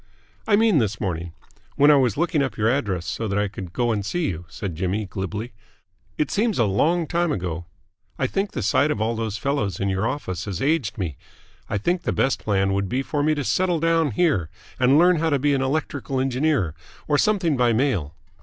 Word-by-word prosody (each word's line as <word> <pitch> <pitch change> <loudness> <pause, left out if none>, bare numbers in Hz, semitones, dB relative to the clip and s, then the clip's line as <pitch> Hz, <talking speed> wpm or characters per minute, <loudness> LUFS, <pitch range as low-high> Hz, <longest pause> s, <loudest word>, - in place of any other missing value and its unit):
"I 210 - +5
mean 215 -6 +4
this 105 -4 -1
morning. 85 -3 -3 0.4
When 145 +2 +6
I - - +7
was 125 -7 +2
looking 160 -2 +1
up 135 - -2
your 110 0 +1
address 100 -10 -1
so 110 +7 -3
that 100 0 -1
I 105 0 +1
could 95 -3 -8
go 120 +4 0
and 105 -2 -1
see 165 - -1
you," 85 0 -5
said 95 -1 -5
Jimmy 95 +5 -1
glibly. 105 +5 -5 0.6
"It 150 - 0
seems 215 0 +1
a 120 - +3
long 160 - +2
time 170 +1 0
ago. 85 - -3 0.5
I 130 - 0
think 195 +9 -1
the 125 - -3
sight 140 +8 +3
of 130 - -1
all 115 +2 0
those 110 -2 -3
fellows 135 - -1
in 100 - 0
your 95 +3 0
office 95 - -4
has 100 -5 -4
aged 135 -6 0
me. 85 -8 -3 0.5
I - - 0
think 175 - 0
the - - -1
best 135 - +1
plan 95 -2 +1
would 100 -1 -1
be 130 +5 -1
for 145 +1 -2
me 155 +1 +2
to 145 - -2
settle 180 +4 +1
down 165 -1 +2
here 105 - +1 0.3
and 130 +2 +5
learn 175 +2 +5
how 160 +1 +1
to 145 - +2
be 145 +2 +1
an 135 - +1
electrical 135 -1 -2
engineer 130 - +1 0.3
or 145 -1 +2
something 185 -8 +2
by 125 -2 +3
mail. 110 - 0
125 Hz, 220 wpm, -23 LUFS, 100-150 Hz, 0.6 s, I